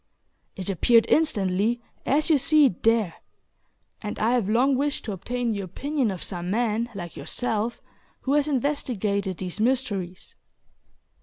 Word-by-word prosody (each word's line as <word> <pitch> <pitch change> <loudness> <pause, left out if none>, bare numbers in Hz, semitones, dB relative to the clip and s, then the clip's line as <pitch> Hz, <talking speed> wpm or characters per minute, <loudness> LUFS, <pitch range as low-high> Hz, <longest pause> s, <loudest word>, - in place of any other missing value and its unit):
It 185 - -6
appeared 225 +5 +4
instantly, 210 -6 +2 0.3
as 305 +4 +2
you 295 - +5
see 305 +2 +5
it 225 -10 0
there; 225 -6 +2 0.8
and 210 -1 -5
I 225 +2 +2
have 240 -5 +1
long 255 +5 +3
wished 285 +2 -1
to 220 - -3
obtain 240 +5 -2
the 205 -2 -2
opinion 270 - -2
of 190 -3 -4
some 175 -1 -4
man, 230 +2 0
like 175 -3 -7
yourself, 230 -1 -2 0.4
who 270 - 0
has 295 0 +3
investigated 220 - -1
these 185 +1 -4
mysteries." 210 -7 -1
225 Hz, 145 wpm, -25 LUFS, 195-260 Hz, 0.8 s, you